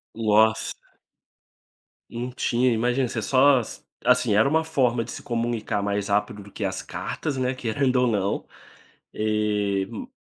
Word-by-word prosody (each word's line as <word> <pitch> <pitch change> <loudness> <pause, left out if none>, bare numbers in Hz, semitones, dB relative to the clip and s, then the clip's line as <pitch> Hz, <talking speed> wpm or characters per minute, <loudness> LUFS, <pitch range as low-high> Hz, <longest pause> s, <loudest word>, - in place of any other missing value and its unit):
Nossa. 110 0 +3 1.4
Não 120 +2 -4
tinha, 125 0 +1
imagina 125 +3 +1
você 115 -1 -3
só, 130 +2 +4 0.4
assim, - - +3
era 110 +6 +4
uma 160 +1 +2
forma 125 -7 +1
de - - -8
se - - -7
comunicar 115 -4 -2
mais 100 0 -1
rápido 105 0 -1
do 100 0 -14
que 105 - -4
as 95 - -3
cartas, 145 -4 -4
né, 130 0 0
querendo 130 +1 0
ou 125 0 +3
não 100 -3 -1 0.7
eh 105 -2 0
ma 260 -1 -7
115 Hz, 145 wpm, -24 LUFS, 105-125 Hz, 1.4 s, só